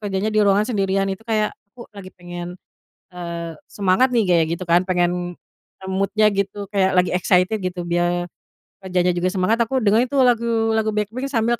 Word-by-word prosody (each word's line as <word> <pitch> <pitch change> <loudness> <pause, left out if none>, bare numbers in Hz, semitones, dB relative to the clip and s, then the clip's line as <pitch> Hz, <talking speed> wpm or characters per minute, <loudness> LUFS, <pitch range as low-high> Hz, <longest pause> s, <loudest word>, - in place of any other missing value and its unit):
kerjanya 205 0 -2
di 215 - 0
ruangan 205 0 +3
sendirian 195 -2 0
itu 190 - -5
kayak, 215 -2 +1 0.2
aku 240 - -10
lagi 190 -2 -10
pengen, 175 0 -8 0.6
eee, 170 -2 -6
semangat 205 +6 +1
nih 230 - +4
kayak 165 -2 +4
gitu 185 - -7
kan 175 +2 +4
pengen, 175 -1 0 0.5
eee, 190 - -6
mood-nya 205 +3 +2
gitu 200 +1 -3
kayak 190 -2 +1
lagi 180 0 +3
excited 180 +3 +2
gitu 185 -2 -4
biar 175 0 -1 0.5
kerjanya 180 -1 0
juga 175 +1 -1
semangat, 195 +5 0
aku 240 +1 0
dengerin 225 +4 +3
tuh 270 0 +2
lagu-lagu 225 -2 +1
BLACKPINK 220 +6 -2
sambil 235 -2 0
195 Hz, 170 wpm, -21 LUFS, 180-220 Hz, 0.6 s, nih